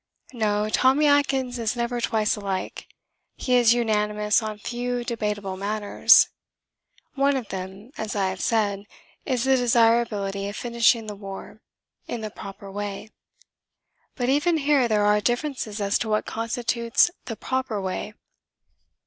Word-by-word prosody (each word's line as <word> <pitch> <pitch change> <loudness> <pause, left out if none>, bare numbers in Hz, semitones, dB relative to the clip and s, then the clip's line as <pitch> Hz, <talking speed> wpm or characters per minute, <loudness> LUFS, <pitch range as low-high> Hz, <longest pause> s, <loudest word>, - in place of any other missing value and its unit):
No; 210 -3 0
Tommy 260 +7 +3
Atkins 270 -4 +2
is 225 0 -1
never 240 0 -2
twice 215 -2 +1
alike. 195 -3 -4 0.5
He 255 - -2
is 240 -1 +5
unanimous 210 -2 +1
on 215 -1 -5
few 245 +2 -3
debatable 210 -4 -3
matters. 205 +1 +4 0.8
One 280 0 +2
of 235 -6 -6
them, 190 +5 -7
as 220 -1 -3
I 195 -2 +1
have 185 0 -5
said, 205 -3 0 0.4
is 255 -4 0
the 265 0 +4
desirability 225 -5 +2
of 205 - -7
finishing 235 -1 +2
the 210 - -6
war 200 +1 -9 0.5
in 235 - -4
the 215 -1 -5
proper 195 0 -10
way. 205 +1 -5 1.0
(But 245 - -2
even 295 +5 +2
here 280 -4 +3
there 210 -2 +2
are 210 0 +3
differences 240 -2 -2
as 200 0 +1
to 225 - -3
what 215 0 +1
constitutes 235 +5 +1
the 225 - -5
proper 260 -3 -2
way.) 190 +2 -4
220 Hz, 140 wpm, -24 LUFS, 205-245 Hz, 1.0 s, is